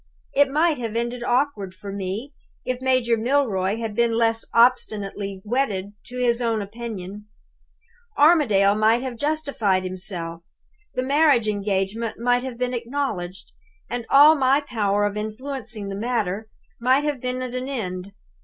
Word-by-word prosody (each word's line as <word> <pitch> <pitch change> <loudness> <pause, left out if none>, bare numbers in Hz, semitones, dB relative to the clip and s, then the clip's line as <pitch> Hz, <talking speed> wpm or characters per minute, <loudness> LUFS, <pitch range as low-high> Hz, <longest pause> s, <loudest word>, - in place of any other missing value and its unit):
It 285 0 +4
might 310 +1 +2
have 230 -2 -4
ended 240 +1 -2
awkwardly 240 -7 0
for 200 - -7
me. 200 +8 -4 0.3
If 255 0 -2
Major 255 -3 +2
Milroy 220 -6 +1
had 225 -2 -4
been 235 0 +2
less 225 -1 +2
obstinately 205 -5 +1
wedded 205 -5 -1
to 250 - -9
his 245 -1 +1
own 230 -2 +1
opinion, 210 -2 -7 0.9
Armadale 245 - +5
might 220 +3 +3
have 255 -2 -4
justified 280 -9 0
himself; 180 -3 -5 0.5
the 255 - 0
marriage 280 -4 +3
engagement 205 +2 -1
might 245 +1 +2
have 260 -3 -6
been 250 0 -1
acknowledged; 230 -8 -4 0.4
and 240 -1 -3
all 290 +3 +8
my 275 -1 +3
power 205 -7 0
of 205 0 -2
influencing 220 -1 -5
the 195 - -4
matter 215 -2 -2 0.3
might 260 +4 +3
have 295 -4 -2
been 255 0 -2
at 250 -1 -5
an 255 +1 -3
end. 190 -7 -4
235 Hz, 145 wpm, -23 LUFS, 200-255 Hz, 0.9 s, all